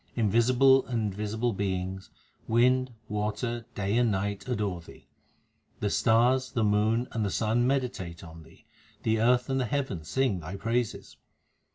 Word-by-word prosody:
Invisible 125 +5 +4
and 110 -5 -1
visible 110 +4 -2
beings, 95 -1 -3 0.4
wind, 125 +2 +3 0.2
water, 110 +3 -3
day 100 +3 0
and 120 -2 +3
night 100 +1 -2
adore 105 -8 -2
Thee. - - -16 0.7
The - - -1
stars, 125 +3 +3
the 115 -4 +1
moon, 110 +4 +2
and 110 - -1
the 100 - 0
sun 115 +5 +1
meditate 120 -11 -2
on 80 -1 -11
Thee; 80 - -19 0.4
the 110 0 +1
earth 125 +1 +3
and 135 -1 0
the 125 - 0
heavens 110 - -3
sing 130 -8 +1
Thy 85 +4 -7
praises. 115 +3 -2
110 Hz, 150 wpm, -28 LUFS, 100-125 Hz, 0.7 s, Invisible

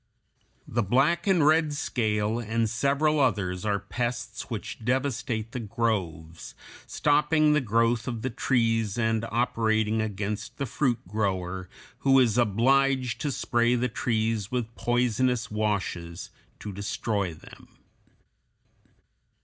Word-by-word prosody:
The 120 - 0
black 140 - +2
and 180 -6 +4
red 155 -1 +3
scale 110 -4 -1
and 115 0 0
several 140 +7 +1
others 95 -9 0
are 105 -1 +1
pests 120 +5 -4
which - - -6
devastate 120 -3 -1
the 125 - -4
groves, 95 -8 -3 0.3
stopping 150 +1 +3
the 150 - +3
growth 115 0 +1
of 115 -3 -4
the 130 - -1
trees 115 -4 +1
and 115 -1 +1
operating 110 -2 +1
against 105 0 -4
the 140 - -2
fruit 125 -3 -1
grower, 95 -3 -2 0.3
who 135 -1 +4
is 125 -3 +4
obliged 130 +3 +2
to 145 - -1
spray 120 -1 +1
the 125 +1 0
trees 110 -2 -1
with 120 -2 -3
poisonous 120 0 0
washes 100 -5 -3 0.3
to 105 - -5
destroy 100 -2 -2
them. - - -15
115 Hz, 120 wpm, -27 LUFS, 105-130 Hz, 0.3 s, and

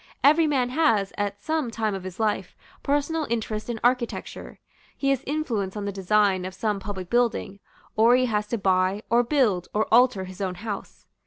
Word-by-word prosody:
Every 310 +3 +5
man 260 -4 +1
has, 230 -9 +2
at 205 0 -3
some 315 -5 -1
time 220 -2 -2
of 195 - -4
his 185 +1 -8
life, 210 -4 -1 0.3
personal 290 +2 0
interest 220 -1 -3
in 230 -2 -3
architecture. 245 -1 -1 0.4
He 275 -1 +1
has 275 -1 0
influence 230 -10 -2
on 205 - -4
the 200 - -2
design 195 0 +2
of 185 0 -6
some 210 -1 -1
public 190 -3 -6
building; 230 -3 0 0.4
or 230 +3 +5
he 255 0 +3
has 210 -3 -1
to 235 - -2
buy, 190 +1 +1
or 235 +1 +5
build, 235 - +1
or 215 +1 +2
alter 240 -4 +4
his 185 +1 -9
own 185 -2 -2
house. 205 +1 -7
215 Hz, 185 wpm, -25 LUFS, 195-250 Hz, 0.4 s, Every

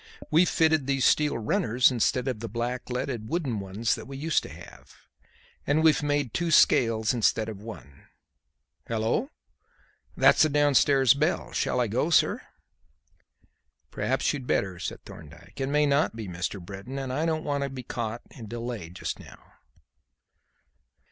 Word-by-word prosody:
"We've 165 +3 +4
fitted 160 -4 +2
these 135 -3 +1
steel 150 -4 +3
runners 115 +3 +2
instead 125 +2 0
of 125 -5 -2
the 115 0 -6
blackleaded 125 0 -3
wooden 140 -11 -2
ones 100 +3 -1
that - - -6
we 135 0 -8
used 155 +3 +1
to - - -10
have. - - -14 0.7
And 155 +3 +2
we've 160 -2 +4
made 145 -4 -1
two 175 -1 -1
scales 115 -7 +4
instead 110 -2 +1
of 105 -3 -7
one. 105 -11 -11 0.8
Hallo! 115 - -1 0.9
That's - - +5
the 155 - +5
downstairs 140 -2 +4
bell. 155 +5 -1
Shall 125 - -1
I 125 - +2
go 120 +8 -1
sir?" 165 - +3 1.5
"Perhaps - - 0
you'd 135 -4 -6
better," 95 -3 -1
said - - -6
Thorndyke. 85 - -12
"It 135 - -1
may 150 +1 +3
not 140 -3 +1
be 110 -3 -6
Mr. 90 +2 -4
Britton, 100 +8 -8
and 135 -2 -4
I 155 +5 0
don't 160 -1 -1
want 145 -1 -1
to 140 - -2
be 130 -1 -8
caught 115 -1 -5
and 115 -6 -10
delayed 115 -7 -6
just - - -4
now." - - -15
125 Hz, 155 wpm, -27 LUFS, 110-145 Hz, 1.5 s, That's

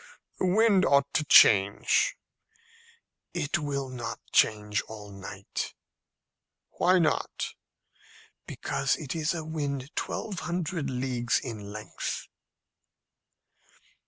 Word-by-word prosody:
"The 185 - +1
wind 200 0 +4
ought 140 -3 +3
to 155 - +2
change." 100 -6 +5 1.2
"It 160 -1 0
will 140 -2 -2
not 120 -3 -5
change 105 -1 +2
all 105 -2 -9
night." 100 0 -6 1.0
"Why 185 +1 +5
not?" 160 -4 0 0.9
"Because 140 -1 -1
it 150 0 -5
is 160 +1 0
a 160 -2 -4
wind 145 -2 -4
twelve 200 -6 -3
hundred 170 -3 -2
leagues 125 -2 0
in 105 -5 -6
length." 105 0 -5
140 Hz, 100 wpm, -28 LUFS, 110-160 Hz, 1.2 s, change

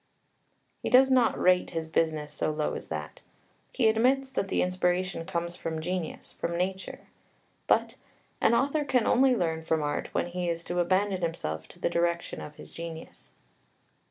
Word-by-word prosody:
He - - -2
does 265 +1 +6
not 250 -3 +3
rate 180 0 +4
his 165 -1 -3
business 155 -2 0
so - - -1
low 155 0 -1
as - - -6
that. - - -6 0.5
He 235 - +2
admits 260 +5 +3
that 195 - -1
the - - +1
inspiration 180 -1 0
comes 170 -2 -2
from 160 -2 -4
genius, 180 +1 -4
from 170 0 -3
nature. 190 +1 -3 0.7
But - - +2 0.4
"an 235 - +5
author 285 +4 +2
can 255 -5 +2
only 260 0 +4
learn 160 -5 -1
from 160 -1 0
art 145 - -2
when - - 0
he 175 0 -3
is 170 0 -2
to 175 +1 -2
abandon 185 +2 +1
himself 80 - -3
to 175 - -16
the - - +1
direction 170 0 -1
of 150 - -9
his - - -12
genius." 165 -1 -9
175 Hz, 170 wpm, -28 LUFS, 165-205 Hz, 0.7 s, does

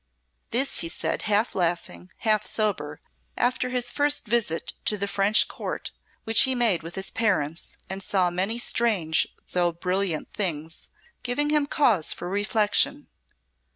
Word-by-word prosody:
This 260 +4 +2
he 165 - 0
said - - -2
half 210 +3 +2
laughing, 170 - -2 0.2
half 215 -1 +3
sober, 195 -9 -2 0.4
after 250 0 0
his 250 -1 +2
first 290 -2 +1
visit 215 -7 -1
to 210 - +1
the 200 0 -2
French 200 +2 +3
Court, - - -6 0.3
which 225 -1 +5
he 265 -1 +4
made 230 -8 +2
with 165 +1 -9
his 190 0 -2
parents 170 -8 -1
and 190 +1 -5
saw 185 -2 +1
many 190 +6 -1
strange 210 -10 +2 0.2
though 175 -1 +1
brilliant 180 0 -2
things, 165 -5 -3 0.3
giving 290 +4 0
him 300 -2 +2
cause 230 - +2
for 175 - -7
reflection. 205 +2 +1
200 Hz, 145 wpm, -25 LUFS, 175-235 Hz, 0.4 s, which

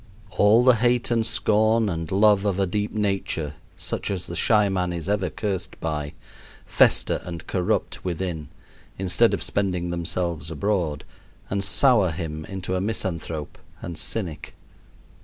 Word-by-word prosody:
All 105 +5 +5
the 125 -2 +6
hate 120 +1 +1
and 115 -1 +2
scorn 110 0 +2
and 85 -4 -3
love 100 0 +4
of 100 -2 0
a 100 - +3
deep 105 +3 -2
nature 95 -7 -1 0.2
such - - -3
as 95 -3 -2
the - - -7
shy 105 -3 +4
man 90 -2 -1
is 85 -1 -5
ever 100 -3 0
cursed 95 +1 -4
by 75 -2 -3 0.5
fester - - +3
and 85 -2 -7
corrupt 90 -2 -1
within, 85 -3 -3 0.5
instead 95 -2 +3
of - - -1
spending 90 -3 -1
themselves 85 -2 -2
abroad, 85 -3 -1 0.5
and 100 0 0
sour 105 -1 +4
him 80 -2 -5
into 95 -1 -5
a 90 - 0
misanthrope 85 -7 -3 0.2
and 85 - -6
cynic. 85 -1 -2
95 Hz, 145 wpm, -24 LUFS, 85-105 Hz, 0.5 s, the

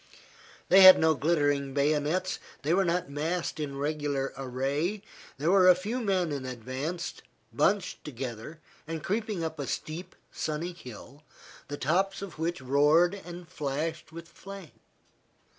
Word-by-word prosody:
They 195 - +8
had 185 0 +11
no 160 0 +4
glittering 145 -2 +1
bayonets, 150 +6 +1 0.2
they 155 +4 +1
were 195 +2 +4
not 175 0 0
massed 160 +4 -2
in 140 -2 -4
regular 145 -2 -2
array. 140 +10 -2 0.3
There 155 +6 +1
were 190 -1 +6
a 180 - +8
few 210 +8 -3
men 185 -6 0
in 140 -2 -3
advance, 130 +7 -4 0.4
bunched 195 -2 +1
together, 130 +2 -7 0.3
and 160 -1 -5
creeping 210 -3 -2
up 160 -1 -4
a 140 - -3
steep, 160 +8 -5 0.2
sunny 160 +3 -3
hill, 135 -2 -12 0.5
the 145 - -5
tops 190 +8 0
of 190 -5 -9
which 170 -1 -2
roared 150 +7 +4
and 175 -3 -9
flashed 155 +3 -4
with 165 0 -9
flame. 195 -1 -11
160 Hz, 140 wpm, -29 LUFS, 140-180 Hz, 0.5 s, had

